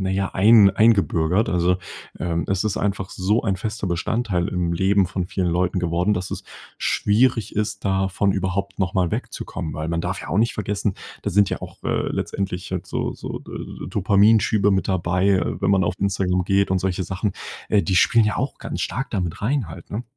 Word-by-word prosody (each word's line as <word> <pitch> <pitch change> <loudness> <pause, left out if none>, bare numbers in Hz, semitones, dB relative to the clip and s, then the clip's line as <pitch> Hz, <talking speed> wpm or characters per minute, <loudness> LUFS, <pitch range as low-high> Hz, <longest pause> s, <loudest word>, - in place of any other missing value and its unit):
na 95 - -1
ja, 95 0 0
ein 105 0 +7
eingebürgert. 100 -3 +3
Also, 90 +1 +2 0.4
ähm, 85 -1 -1
es 95 +1 0
ist 105 - -1
einfach 95 -1 -2
so 100 +5 0
ein 100 -4 0
fester 110 +1 -4
Bestandteil 90 +1 -1
im 90 -3 -1
Leben 95 +2 +3
von 90 -1 -3
vielen 95 -1 -2
Leuten 90 +2 0
geworden, 90 +4 +1
dass 90 -1 -4
es - - -5 0.4
schwierig 115 0 +1
ist, 105 -1 -2
davon 95 0 +1
überhaupt 95 +1 -2
noch 95 0 -1
mal 90 -3 +2
wegzukommen, 80 -5 -5
weil 80 +1 -4
man 85 0 -1
darf - - -3
ja - - -8
auch 90 - 0
nicht 115 +1 +2
vergessen, 105 -1 -2 0.3
da - - -2
sind 100 +1 +3
ja - - -3
auch, - - -10
äh, - - 0
letztendlich 95 -2 -3
halt 90 -2 -3
so - - -2
so - - -6
D - - -12
äh, - - -7
Dopamin-Schübe 105 +1 +3
mit 95 -2 +1
dabei, 90 +1 +1
äh, 90 -3 +1
wenn 100 - +2
man 95 -2 +3
auf 85 - -1
Instagram 95 -2 0
geht 100 0 +2
und 95 - +2
solche 95 0 -1
Sachen. 95 +3 -2 0.4
Äh, 105 - +3
die 95 -3 0
spielen 115 +3 +5
ja 105 - 0
auch 130 +2 -3
ganz - - -5
stark 135 +2 -3
da 100 - -1
mit 90 +2 -4
rein 125 - 0
halt, 85 +2 -11
ne? 110 +4 -3
95 Hz, 210 wpm, -22 LUFS, 90-105 Hz, 0.4 s, ein